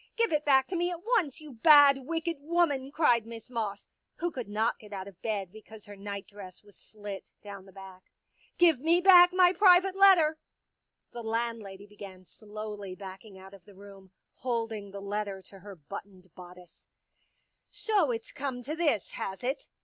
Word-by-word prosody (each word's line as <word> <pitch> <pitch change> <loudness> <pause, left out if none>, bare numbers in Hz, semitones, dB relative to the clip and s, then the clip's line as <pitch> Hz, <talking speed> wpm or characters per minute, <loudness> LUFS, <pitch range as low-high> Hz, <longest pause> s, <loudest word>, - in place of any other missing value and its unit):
Give 460 -7 +1
it 300 0 +1
back 265 -2 +4
to 370 - -3
me 350 +1 0
at 350 -1 -7
once, 365 - 0
you 305 -2 -12
bad, 280 +2 +6
wicked 330 0 -2
woman," 290 -4 0
cried 240 -8 +2
Miss 230 +1 -11
Moss, 215 -4 -4 0.3
who 345 0 -3
could 250 -8 -7
not 220 +3 -1
get 210 -1 -15
out 190 -1 -6
of 190 -3 -14
bed 200 -5 -3
because 220 0 -14
her 205 - -11
night 200 0 -7
dress 195 -2 -12
was 205 -1 -20
slit 205 -2 -10
down 200 -2 -10
the - - -15
back. 190 -1 -14 0.5
Give 335 -6 +4
me 330 +5 +3
back 360 -1 +7
my 365 -1 +5
Pictures - - -9
_ - - -28
private 375 -1 +5
letter." 350 -6 +5 0.7
The 240 - -7
landlady 225 -3 -4
began 200 -3 -12
slowly 210 -1 -8
backing 190 +1 -11
out 190 +1 -14
of 190 -3 -16
the 200 - -17
room, 195 -1 -14 0.3
holding 225 -4 -3
the 200 0 -9
letter 200 -1 -4
to 195 - -15
her 200 +1 -11
buttoned 185 +2 -11
bodice. 180 -1 -15 0.5
" - - -48
So 405 - 0
it's 230 -2 -4
come 260 -3 -5
to 300 +5 -5
this, 310 - 0
has 195 +4 -6
it 265 +3 -3
220 Hz, 190 wpm, -29 LUFS, 200-305 Hz, 0.7 s, back